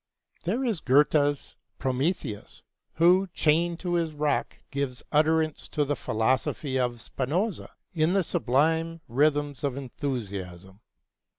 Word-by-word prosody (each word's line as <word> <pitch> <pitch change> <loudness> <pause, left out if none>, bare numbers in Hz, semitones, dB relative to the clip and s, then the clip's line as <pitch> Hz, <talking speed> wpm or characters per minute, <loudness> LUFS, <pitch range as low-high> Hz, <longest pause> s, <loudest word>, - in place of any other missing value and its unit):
There 225 +10 0
is 225 -9 0
Goethe's 145 +1 +2 0.2
Prometheus, 130 - -2 0.3
who, 180 +4 +4
chained 165 +2 +2
to 175 -2 -2
his 165 -2 0
rock, 150 0 -1
gives 135 -3 -3
utterance 155 0 +2
to 150 -2 0
the 145 +1 0
philosophy 130 +4 0
of 120 -1 -1
Spinoza 170 - -2 0.2
in 160 +1 +2
the 195 -1 +3
sublime 160 +5 +1
rhythms 145 +2 +1
of 140 -2 -1
enthusiasm. 100 -9 -5
145 Hz, 115 wpm, -27 LUFS, 130-165 Hz, 0.3 s, who